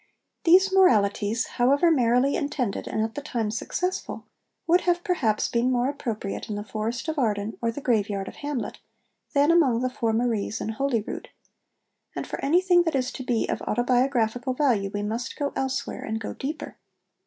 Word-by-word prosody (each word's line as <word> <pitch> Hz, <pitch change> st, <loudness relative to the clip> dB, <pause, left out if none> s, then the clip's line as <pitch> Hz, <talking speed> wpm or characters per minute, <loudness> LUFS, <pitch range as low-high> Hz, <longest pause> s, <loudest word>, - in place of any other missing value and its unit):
These 380 Hz, +3 st, +6 dB
moralities, 220 Hz, -, +3 dB, 0.2 s
however 280 Hz, +7 st, +4 dB
merrily 250 Hz, -1 st, +3 dB
intended 275 Hz, -, -2 dB
and 220 Hz, -, -1 dB
at 225 Hz, 0 st, -3 dB
the 290 Hz, -, -5 dB
time 235 Hz, -7 st, -2 dB
successful, 360 Hz, +11 st, -3 dB, 0.4 s
would 350 Hz, +2 st, +4 dB
have 350 Hz, 0 st, +1 dB
perhaps 230 Hz, -, +1 dB
been 240 Hz, +2 st, +1 dB
more 250 Hz, +1 st, +1 dB
appropriate 230 Hz, -7 st, -4 dB
in 210 Hz, -, -2 dB
the 205 Hz, -, -4 dB
Forest 220 Hz, +6 st, -4 dB
of 315 Hz, -2 st, -1 dB
Arden 210 Hz, -3 st, 0 dB
or 230 Hz, -, +1 dB
the 260 Hz, +5 st, -5 dB
graveyard 205 Hz, -6 st, 0 dB
of -, -, -9 dB
Hamlet, 290 Hz, -4 st, -4 dB, 0.6 s
than 285 Hz, +3 st, +5 dB
among 270 Hz, -9 st, +4 dB
the 255 Hz, 0 st, 0 dB
four 230 Hz, -2 st, -1 dB
Maries 225 Hz, -2 st, 0 dB
in -, -, -3 dB
Holyrood; 230 Hz, -1 st, -2 dB, 0.9 s
and -, -, -3 dB
for -, -, -6 dB
anything 355 Hz, +4 st, +4 dB
that 325 Hz, -4 st, -1 dB
is 255 Hz, -1 st, 0 dB
to 260 Hz, -, -7 dB
be 240 Hz, -3 st, 0 dB
of -, -, -2 dB
autobiographical 245 Hz, 0 st, +1 dB
value 240 Hz, -9 st, +2 dB
we 205 Hz, 0 st, -3 dB
must 225 Hz, +3 st, -3 dB
go 285 Hz, -1 st, -2 dB
elsewhere 265 Hz, 0 st, -2 dB
and 220 Hz, 0 st, -3 dB
go 215 Hz, -, -5 dB
deeper. 290 Hz, +4 st, -6 dB
245 Hz, 175 wpm, -25 LUFS, 220-285 Hz, 0.9 s, These